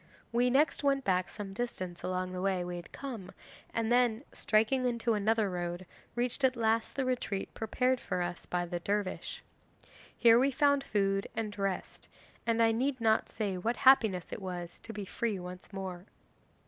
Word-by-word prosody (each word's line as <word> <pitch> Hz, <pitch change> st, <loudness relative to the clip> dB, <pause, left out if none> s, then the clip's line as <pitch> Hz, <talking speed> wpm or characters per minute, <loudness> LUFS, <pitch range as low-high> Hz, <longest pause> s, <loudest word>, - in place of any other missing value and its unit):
We 240 Hz, +2 st, +3 dB
next 290 Hz, +4 st, +2 dB
went 275 Hz, -1 st, +2 dB
back 185 Hz, -3 st, +1 dB
some 200 Hz, -2 st, -7 dB
distance 185 Hz, -6 st, -4 dB
along 185 Hz, 0 st, -2 dB
the 180 Hz, 0 st, -4 dB
way 190 Hz, -2 st, +1 dB
we 175 Hz, 0 st, -4 dB
had 175 Hz, -, -10 dB
come, 230 Hz, -9 st, -7 dB, 0.4 s
then, 235 Hz, +1 st, +2 dB
striking 225 Hz, +4 st, +2 dB
into 235 Hz, -1 st, +1 dB
another 215 Hz, +1 st, +2 dB
road, 175 Hz, 0 st, -3 dB, 0.3 s
reached 245 Hz, +3 st, -1 dB
at 260 Hz, -1 st, +4 dB
last 225 Hz, -1 st, +1 dB
the 270 Hz, -, 0 dB
retreat 210 Hz, -6 st, -2 dB
prepared 250 Hz, +3 st, +1 dB
for 180 Hz, -, -3 dB
us 175 Hz, 0 st, -5 dB
by 175 Hz, 0 st, -1 dB
the 175 Hz, 0 st, -3 dB
dervish. 200 Hz, +2 st, -2 dB, 0.7 s
Here 230 Hz, 0 st, +7 dB
we 270 Hz, +2 st, +4 dB
found 285 Hz, 0 st, +3 dB
food 195 Hz, -3 st, 0 dB
and 215 Hz, -2 st, -3 dB
rest, 195 Hz, -2 st, -3 dB, 0.4 s
and 230 Hz, 0 st, +3 dB
I 225 Hz, -, +5 dB
need 260 Hz, +4 st, 0 dB
not 220 Hz, -1 st, +2 dB
say 200 Hz, -4 st, -2 dB
what 230 Hz, +6 st, -1 dB
happiness 220 Hz, -9 st, +5 dB
it -, -, -6 dB
was 175 Hz, -2 st, -5 dB
to 225 Hz, -, -8 dB
be 210 Hz, -2 st, -5 dB
free 220 Hz, +1 st, -2 dB
once 180 Hz, +1 st, -8 dB
more. 190 Hz, -1 st, -6 dB
215 Hz, 175 wpm, -31 LUFS, 185-245 Hz, 0.7 s, Here